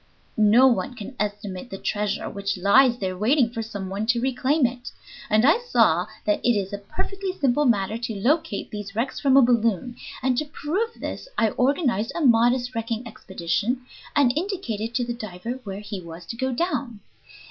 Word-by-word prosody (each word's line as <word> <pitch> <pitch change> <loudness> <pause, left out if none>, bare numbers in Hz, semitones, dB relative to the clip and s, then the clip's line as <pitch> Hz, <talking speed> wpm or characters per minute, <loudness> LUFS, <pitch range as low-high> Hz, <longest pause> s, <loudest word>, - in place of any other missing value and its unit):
No 215 +4 +6
one 260 +1 +2
can 230 +4 -8
estimate 205 +1 -4
the 195 - -6
treasure 205 0 -2
which 200 -1 -3
lies 240 +7 +5
there 190 -4 -3
waiting 235 +5 +2
for 230 -2 -4
some 205 -4 -6
one 200 +3 -3
to 240 0 +3
reclaim 265 +3 +1
it. 245 0 -3 0.4
And 215 +3 +4
I 320 - +5
saw 225 - +2 0.2
that 210 -1 +1
it 240 - +4
is 195 0 -3
a 200 - -3
perfectly 380 - -4
simple 290 -3 +1
matter 220 -2 +1
to 235 -2 -4
locate 260 -2 0
these 205 -1 -7
wrecks 235 +4 -2
from 275 -2 +4
a 275 - +8
balloon, 235 -1 +1 0.3
and 255 -1 +2
to 305 - -2
prove 350 +10 -2
this - - -6
I 225 - +3
organized 255 - +1
a 340 - -2
modest 245 +1 +3
wrecking 230 +1 -3
expedition, 210 +5 -2 0.3
and 270 -3 +4
indicated 270 - -3
to 245 - +1
the 240 - -3
diver 230 +2 -6
where 195 0 -5
he 205 -2 -6
was 170 0 -10
to 230 - -6
go 260 +2 -1
down. 250 - -2
235 Hz, 185 wpm, -24 LUFS, 205-265 Hz, 0.4 s, a